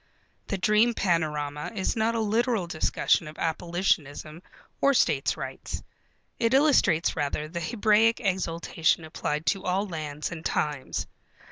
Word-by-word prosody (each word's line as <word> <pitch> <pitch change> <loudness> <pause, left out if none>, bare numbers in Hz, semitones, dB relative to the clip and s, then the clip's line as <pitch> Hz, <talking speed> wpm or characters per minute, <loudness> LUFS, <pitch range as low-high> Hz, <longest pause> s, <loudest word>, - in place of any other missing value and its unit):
The 200 - -2
dream 215 +4 +3
panorama 150 -4 -1
is 190 - -1
not 225 +1 +1
a - - 0
literal 225 -1 +1
discussion 160 -1 +1
of 155 - -10
abolitionism 165 -2 -1 0.4
or 280 0 +4
states' - - +2
rights. - - -6 0.6
It 230 +2 +2
illustrates 265 - +3
rather 150 0 -2
the 170 +2 -5
Hebraic 220 +4 +3
exultation 170 -5 0
applied 155 0 -3
to 195 +2 0
all 190 +3 0
lands 155 -3 -5
and 165 -2 -7
times. 150 -5 -2
175 Hz, 130 wpm, -27 LUFS, 155-215 Hz, 0.6 s, or